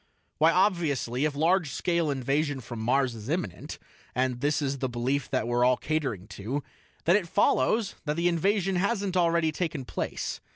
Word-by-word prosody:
"Why, 160 +2 +6
obviously, 160 - +1
if 150 -2 -1
large 165 +2 +2
scale 170 0 0
invasion 140 +2 0
from 120 -2 -7
Mars 130 +2 +1
is 110 +1 -8
imminent 145 - -3 0.4
and 125 -1 0
this 145 +1 +1
is 140 -2 -2
the 130 - -1
belief 125 +3 -1
that 130 -3 0
we're 120 0 +2
all 125 0 +4
catering 135 - -2
to 130 +8 -4 0.4
then 175 - +5
it 200 -5 +1
follows 200 - +2
that 150 0 -1
the 170 +2 +1
invasion 190 +2 +1
hasn't 200 0 0
already 170 -2 +3
taken 155 -5 -3
place. - - -4
145 Hz, 170 wpm, -28 LUFS, 130-170 Hz, 0.4 s, Why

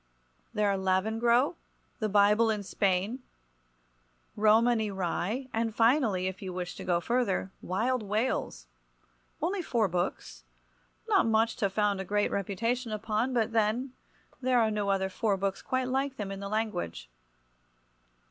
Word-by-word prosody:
There 210 0 +1
are 200 -1 +1
"Lavengro," 225 - +2 0.5
"The 215 - -1
Bible 210 +3 +4
in 210 -2 -1
Spain," 195 +5 0 1.2
"Romany 220 +1 +3
Rye," 195 +6 -2
and, 225 -1 -1
finally, 225 -6 +3
if 190 0 -4
you 190 -2 -5
wish 180 0 -4
to - - -7
go 175 -1 +1
further, 205 -2 0
"Wild 235 +7 0
Wales." 210 - -2 0.8
Only 370 +3 0
four 235 - +1
books—not - - -3
much 225 +1 +2
to 205 -5 +1
found 205 0 0
a - - -3
great 205 +2 0
reputation 230 +5 -1
upon—but, 220 +2 0
then, 230 +4 +1 0.5
there 255 -1 +3
are 220 -2 +2
no 205 -1 -1
other 195 -1 +1
four 195 +1 0
books 195 0 -2
quite 260 -1 -1
like 270 +1 -1
them 200 -2 -4
in 195 - -5
the 200 0 -5
language. 210 - -3
210 Hz, 140 wpm, -29 LUFS, 190-235 Hz, 1.2 s, Bible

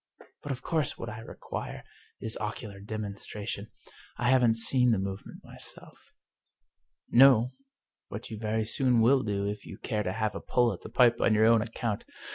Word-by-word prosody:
But 145 - -5
of 125 - -5
course 160 -3 0
what 115 - -6
I 110 +1 -7
require 115 - -7 0.4
is 110 0 -3
ocular 105 -1 -5
demonstration. 105 0 -5 0.5
I 120 +1 +2
haven't 125 -3 +4
seen 125 +2 +4
the 115 - +3
move 95 +1 -4
ment - - -12
myself." - - -13 0.5
" - - -49
No, 125 -3 +7 0.6
but 105 +3 -7
you 110 - -6
very 110 0 -1
soon 125 0 +2
will 130 +4 +5
do 100 -3 -2
if 105 0 -4
you - - -10
care 105 -3 -2
to 95 - -2
have 110 0 -1
a - - -6
pull 120 -1 +2
at - - -10
the - - -9
pipe 120 0 +4
on 110 - +4
your 110 +1 +5
own 115 -1 +5
account. 115 -1 -3
110 Hz, 185 wpm, -29 LUFS, 105-120 Hz, 0.6 s, No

